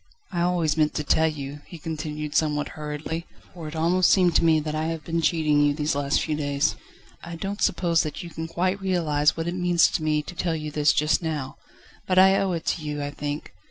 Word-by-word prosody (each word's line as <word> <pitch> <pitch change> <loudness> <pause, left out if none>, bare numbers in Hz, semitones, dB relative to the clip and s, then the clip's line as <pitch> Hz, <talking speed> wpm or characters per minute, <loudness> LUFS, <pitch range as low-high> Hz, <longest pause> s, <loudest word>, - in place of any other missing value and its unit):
"I 175 -2 -1
always 170 -3 +1
meant 155 -1 +2
to 150 - -1
tell 160 +2 +3
you," 145 -1 -5
he 170 - -9
continued 150 -1 -5
somewhat 150 -2 +1
hurriedly; 150 +2 -5 0.3
"for 170 -3 -8
it 155 - -7
almost 175 +3 +3
seemed 180 -3 +4
to - - +1
me 160 -1 +4
that 155 0 -4
I 155 +1 -1
have 165 -1 -3
been 165 +1 -1
cheating 155 -3 +2
you, 145 0 +3
these 150 0 0
last 140 0 0
few 155 - -1
days. 145 0 0 0.5
I 170 0 -7
don't 195 +4 -5
suppose 170 -3 +2
that 155 +3 -5
you 170 - -9
can 160 0 -5
quite 185 +4 -1
realise 160 -6 +1
what 165 +1 -2
it 175 - -1
means 180 -2 +3
to - - -2
me 155 -1 +1
to 180 - -8
tell 170 -1 -1
you 155 -1 -5
this 150 0 +3
just 150 +3 +2
now; 150 -5 -4 0.5
but 185 - +1
I 190 +1 +7
owe 190 -2 0
it 165 -1 -4
to 170 - -1
you, 150 -1 -4
I 145 0 -3
think. 145 +1 -5
160 Hz, 230 wpm, -25 LUFS, 150-170 Hz, 0.5 s, I